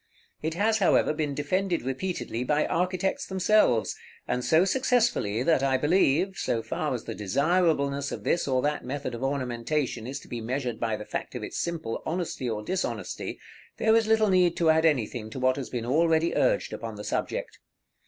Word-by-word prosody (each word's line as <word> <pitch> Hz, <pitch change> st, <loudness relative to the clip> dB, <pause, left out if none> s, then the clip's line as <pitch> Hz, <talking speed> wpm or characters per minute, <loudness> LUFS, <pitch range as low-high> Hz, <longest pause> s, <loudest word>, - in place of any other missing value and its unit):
It 160 Hz, +1 st, -2 dB
has, 220 Hz, +4 st, +2 dB
however, 185 Hz, -5 st, +3 dB
been 150 Hz, -2 st, -2 dB
defended 175 Hz, +3 st, 0 dB
repeatedly 135 Hz, -2 st, -3 dB
by 150 Hz, +3 st, +1 dB
architects 185 Hz, +2 st, -1 dB
themselves, 190 Hz, -, +2 dB, 0.3 s
and 125 Hz, -, -1 dB
so 160 Hz, +7 st, +4 dB
successfully, 230 Hz, -, +1 dB
that 160 Hz, -2 st, +3 dB
I 135 Hz, -1 st, +2 dB
believe, 175 Hz, +4 st, +2 dB
so 115 Hz, -1 st, -1 dB
far 135 Hz, +5 st, -2 dB
as 120 Hz, -, -5 dB
the -, -, -5 dB
desirableness 140 Hz, -, +1 dB
of -, -, -6 dB
this 170 Hz, -, +1 dB
or 130 Hz, -2 st, +1 dB
that 150 Hz, 0 st, -1 dB
method 130 Hz, 0 st, -4 dB
of 120 Hz, -, -6 dB
ornamentation 130 Hz, -2 st, -2 dB
is 135 Hz, -, -4 dB
to -, -, -15 dB
be 120 Hz, -1 st, -5 dB
measured 125 Hz, 0 st, -3 dB
by 115 Hz, -2 st, 0 dB
the 105 Hz, -, -7 dB
fact -, -, -5 dB
of -, -, -4 dB
its -, -, -4 dB
simple 165 Hz, -10 st, -3 dB
honesty 165 Hz, -7 st, -3 dB
or 105 Hz, -1 st, -3 dB
dishonesty, 185 Hz, -, -3 dB, 0.4 s
there 220 Hz, 0 st, +3 dB
is 225 Hz, -1 st, +3 dB
little 220 Hz, -1 st, +4 dB
need 180 Hz, -2 st, +3 dB
to 165 Hz, -2 st, +4 dB
add 160 Hz, +1 st, +3 dB
anything 120 Hz, -7 st, 0 dB
to 120 Hz, -, -7 dB
what 130 Hz, 0 st, +3 dB
has 135 Hz, -3 st, -5 dB
been 120 Hz, -2 st, -3 dB
already 160 Hz, +5 st, +2 dB
urged -, -, +1 dB
upon -, -, -6 dB
the -, -, -7 dB
subject. -, -, -3 dB
150 Hz, 185 wpm, -27 LUFS, 125-180 Hz, 0.4 s, so